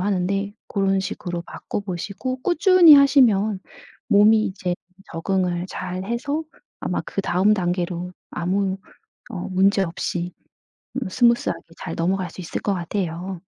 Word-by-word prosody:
하는데 195 +1 -1 0.2
고런 195 -1 +1
식으로 175 -2 -4
바꿔 205 - -6
보시고 205 +7 -5
꾸준히 350 -2 +7
하시면 230 -8 +5 0.5
몸이 215 +2 +5
이제 185 -2 -3 0.4
적응을 180 +1 -1
잘 185 +1 -5
해서 280 +8 -2 0.4
아마 - - -1
그다음 195 +2 +1
단계로 180 -1 -2 0.2
아무 190 +2 -1 0.5
어 190 -6 -5
문제 195 +1 +3
없이 175 0 -3 0.6
뭐 265 -6 -3
스무스하게 235 +3 +2 0.2
잘 - - -5
넘어갈 180 +1 0
수 185 - -9
있을 170 - -4
것 200 - 0
같아요. 180 0 -4
195 Hz, 270 characters per minute, -22 LUFS, 180-215 Hz, 0.6 s, 꾸준히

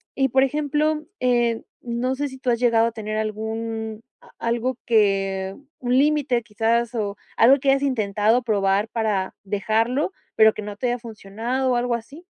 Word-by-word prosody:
y, 270 -1 +2
por 265 +2 +4
ejemplo, 300 +2 0 0.2
eh, 240 -2 +2 0.2
¿no 245 +2 -2
sé 290 +2 -2
si 265 -1 -10
tú 255 - -2
has 235 -1 +2
llegado 230 -2 +4
a - - -2
tener 215 -1 -5
algún 220 +1 -4 0.2
a - - -19
algo 235 +2 -1
que 195 -3 +1 0.2
un 250 0 +1
límite, 280 -4 +2
quizás, 230 +2 0
o 205 -3 -2 0.2
algo 260 +4 +7
que 275 - +2
hayas 275 +1 +3
intentado 220 -2 +2
probar 205 -1 +1
para 215 -5 -1
dejarlo, 225 - 0 0.2
pero 220 -1 +6
que 215 - -6
no 205 0 -6
te 245 +4 -2
haya 245 0 -1
funcionado, 235 +4 -3
o - - +2
algo 240 0 0
así? 275 +8 -9
230 Hz, 175 wpm, -23 LUFS, 215-255 Hz, 0.2 s, algo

